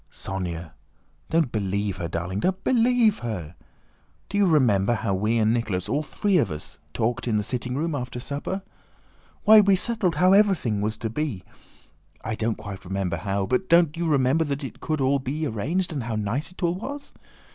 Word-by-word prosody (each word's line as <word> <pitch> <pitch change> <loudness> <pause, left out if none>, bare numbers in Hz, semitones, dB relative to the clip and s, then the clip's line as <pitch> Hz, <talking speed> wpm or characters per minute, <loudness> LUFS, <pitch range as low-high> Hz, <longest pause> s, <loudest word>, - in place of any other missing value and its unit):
"Sónya, 85 -4 -4 0.6
don't 160 -6 +2
believe 100 -2 -1
her, 85 -2 -3
darling! 85 +4 -3
Don't 190 - -1
believe 240 -3 +3
her! 95 -9 -5 0.8
Do 205 - -1
you 200 - +4
remember 120 - +3
how 110 -3 -1
we 105 +5 +1
and 110 0 +3
Nicholas, 105 -6 -1
all 150 - 0
three 195 +5 0
of 135 - +1
us, 75 -2 -8
talked 115 +7 -1
in 110 -2 +2
the 105 - 0
sitting 125 +2 -3
room 160 +3 -1
after 125 -3 -4
supper? 145 +9 -4 0.8
Why, 215 +1 +9
we 200 -1 +4
settled 190 -4 +1
how 180 +5 +5
everything 190 - +3
was 110 +1 -2
to 110 -2 -4
be. 120 -8 -3 0.8
I 110 - -3
don't 110 0 -1
quite 100 -3 -8
remember 95 -2 -2
how, 100 +3 -1
but 130 - -1
don't 170 -2 +5
you 170 0 -2
remember 145 +1 +3
that 145 0 -3
it 135 - -7
could 155 -2 -2
all 135 +1 +2
be 145 +4 -3
arranged 155 - -1
and 140 - -2
how 115 -1 -3
nice 110 +9 -2
it 180 - -10
all 170 0 +2
was? 285 +6 -7
125 Hz, 190 wpm, -25 LUFS, 105-170 Hz, 0.8 s, Why